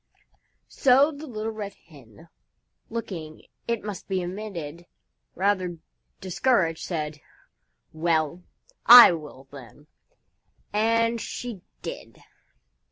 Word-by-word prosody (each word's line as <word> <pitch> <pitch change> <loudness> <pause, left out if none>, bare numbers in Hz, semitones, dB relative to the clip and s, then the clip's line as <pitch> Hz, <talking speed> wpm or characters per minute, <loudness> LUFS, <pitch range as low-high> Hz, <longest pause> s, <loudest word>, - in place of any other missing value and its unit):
So 275 +3 +4
the 305 +1 -10
Little 220 -3 -4
Red 205 -2 -7
Hen, 125 - -18 0.6
looking, 175 -9 -7 0.2
it 235 -2 -2
must 205 -2 -7
be 190 -2 -1
admitted, 175 -4 -7 0.5
rather 185 -2 0 0.4
discouraged, 185 -3 0
said, 150 -3 -4 0.7
"Well, 160 0 0 0.5
I 245 -4 +11
will, 150 -5 -8
then." 140 +1 -13 0.9
And 230 +2 +1
she 235 -7 -6 0.2
did. - - -8
185 Hz, 95 wpm, -25 LUFS, 160-225 Hz, 0.9 s, I